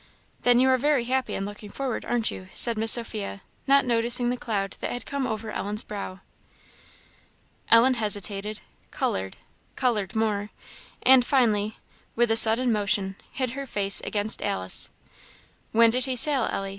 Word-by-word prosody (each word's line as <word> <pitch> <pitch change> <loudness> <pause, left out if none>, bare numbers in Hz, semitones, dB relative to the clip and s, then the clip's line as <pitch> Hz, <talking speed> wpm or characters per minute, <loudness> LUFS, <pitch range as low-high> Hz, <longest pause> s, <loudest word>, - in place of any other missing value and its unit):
"Then 245 0 +4
you 260 - +3
are 260 - +2
very 285 -2 +1
happy 260 +1 -2
in 195 - -3
looking 205 +1 -9
forward, 265 +1 -4
aren't 235 -2 -1
you?" 185 - -9
said 235 -2 +4
Miss 220 0 +3
Sophia, 215 -4 -2 0.3
not 275 0 +4
noticing 240 +1 +1
the - - -2
cloud 205 -5 -4
that - - -4
had 245 - -6
come 280 -2 -3
over 220 -1 -5
Ellen's 210 +2 -4
brow. 195 -3 -7 1.5
Ellen 235 +3 +6
hesitated 210 -2 -2 0.3
coloured 95 0 -3 0.4
coloured 215 -5 -1
more 210 -2 -1 0.5
and 260 -1 +6
finally, 220 -5 0 0.4
with 235 -1 +1
a - - +3
sudden 225 +3 +5
motion, 200 -2 0 0.2
hid 255 -2 -3
her 275 +2 -7
face 200 -3 +2
against 210 0 +1
Alice. 95 0 0 0.8
"When 230 0 +4
did 250 +1 0
he 260 -1 -3
sail, 265 0 +5
Ellie?" 195 0 -3
225 Hz, 155 wpm, -25 LUFS, 205-250 Hz, 1.5 s, Ellen